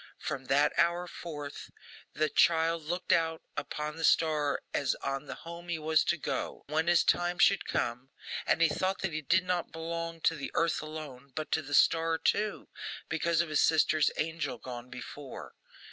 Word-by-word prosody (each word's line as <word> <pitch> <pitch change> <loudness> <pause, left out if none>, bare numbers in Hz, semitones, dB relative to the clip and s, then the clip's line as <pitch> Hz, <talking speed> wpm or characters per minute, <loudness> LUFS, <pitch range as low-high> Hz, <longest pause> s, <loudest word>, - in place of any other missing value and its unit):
From 135 -1 -4
that 140 +3 +3
hour 170 +1 +3
forth, 150 -5 -7 0.4
the 155 - +1
child 165 +1 +3
looked 175 +3 -2
out 160 -1 +2
upon 150 +1 -4
the 165 - -5
star 155 -3 +2
as 140 -2 +1
on 135 +1 -4
the - - -5
home 170 +1 -8
he 170 - 0
was 155 0 +2
to 175 - +1
go - - -4
to, 150 - -8
when 160 +2 +1
his 175 -1 +5
time 175 0 +2
should 195 - +4
come; 125 +3 -2 0.4
and 165 - +3
he - - +7
thought 185 +5 -1
that 190 -4 -1
he 155 - -2
did 175 +5 +3
not 180 -1 -1
belong 165 0 -4
to 165 - +3
the 140 - -5
earth 165 0 +2
alone, 150 -4 -8
but 155 -1 -4
to 160 - +2
the 145 -1 -2
star 165 +2 +4
too, 210 +5 0 0.4
because 165 +1 +2
of 170 - -3
his 155 - +2
sister's 155 -2 +4
angel 155 -5 -2
gone 125 0 -8
before. 130 +2 -8
160 Hz, 185 wpm, -30 LUFS, 145-170 Hz, 0.4 s, he